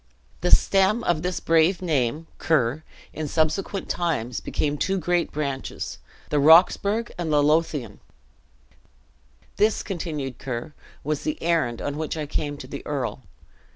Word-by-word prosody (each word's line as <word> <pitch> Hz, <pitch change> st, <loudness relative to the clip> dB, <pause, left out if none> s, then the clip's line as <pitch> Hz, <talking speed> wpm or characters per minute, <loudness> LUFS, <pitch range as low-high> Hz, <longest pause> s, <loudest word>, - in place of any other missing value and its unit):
The 180 Hz, -, +1 dB
stem 195 Hz, +6 st, +4 dB
of 170 Hz, -3 st, +1 dB
this 180 Hz, +1 st, -2 dB
brave 165 Hz, +3 st, +3 dB
name, 150 Hz, -3 st, 0 dB, 0.9 s
in 155 Hz, -1 st, -4 dB
subsequent 160 Hz, +6 st, -1 dB
times, 125 Hz, -9 st, -1 dB
became 145 Hz, -1 st, -2 dB
two 195 Hz, 0 st, 0 dB
great 175 Hz, 0 st, 0 dB
branches, 140 Hz, -3 st, -4 dB, 0.3 s
the 150 Hz, -, +2 dB
Roxburghe 190 Hz, +8 st, +5 dB
and 165 Hz, -3 st, -2 dB
the 145 Hz, -1 st, +4 dB
Lothian. 150 Hz, -8 st, 0 dB, 1.6 s
"This," 215 Hz, +1 st, +2 dB
continued 155 Hz, -, -4 dB
Ker, 125 Hz, +2 st, -5 dB, 0.3 s
"was 150 Hz, 0 st, -2 dB
the 310 Hz, 0 st, -2 dB
errand 160 Hz, -9 st, 0 dB
on 145 Hz, 0 st, -3 dB
which 160 Hz, +1 st, -3 dB
I 155 Hz, -, -2 dB
came 145 Hz, 0 st, -3 dB
to 130 Hz, -, -9 dB
the 140 Hz, +1 st, -7 dB
earl. 135 Hz, -3 st, -3 dB
155 Hz, 135 wpm, -24 LUFS, 145-175 Hz, 1.6 s, Roxburghe